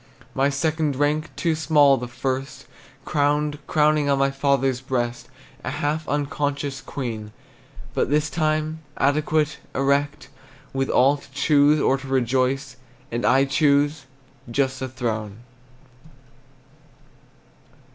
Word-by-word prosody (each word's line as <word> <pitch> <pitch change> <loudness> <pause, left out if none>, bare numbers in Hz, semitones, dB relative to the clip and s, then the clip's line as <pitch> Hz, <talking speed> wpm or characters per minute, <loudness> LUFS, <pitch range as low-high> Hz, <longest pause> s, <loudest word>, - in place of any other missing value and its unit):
My 135 +1 +2
second 155 0 0
rank, 150 +3 0
too 165 -2 0
small 150 -3 +4
the 125 -2 -5
first, 130 +2 -4 0.4
Crowned, 150 0 0
crowing 150 -1 +2
on 140 - +3
my 135 0 +2
father's 135 -2 +1
breast, 120 -3 -3 0.3
A - - -3
half 150 +3 -2
unconscious 145 -1 -2
queen; 110 -6 -5 0.6
But - - 0
this 150 +1 +2
time, 155 0 -1 0.2
adequate, 150 +1 +1 0.2
erect, 140 +2 0 0.4
With 135 0 -1
will 135 +3 +4
to 140 - -17
choose 145 +1 +4
or 135 -1 +2
to 135 - -9
reject. 130 +1 0 0.3
And 120 +1 -2
I 135 +2 +4
choose 145 0 +2 0.4
just 130 +1 0
a 130 - -2
throne. 110 -4 -4
140 Hz, 115 wpm, -23 LUFS, 130-150 Hz, 0.6 s, small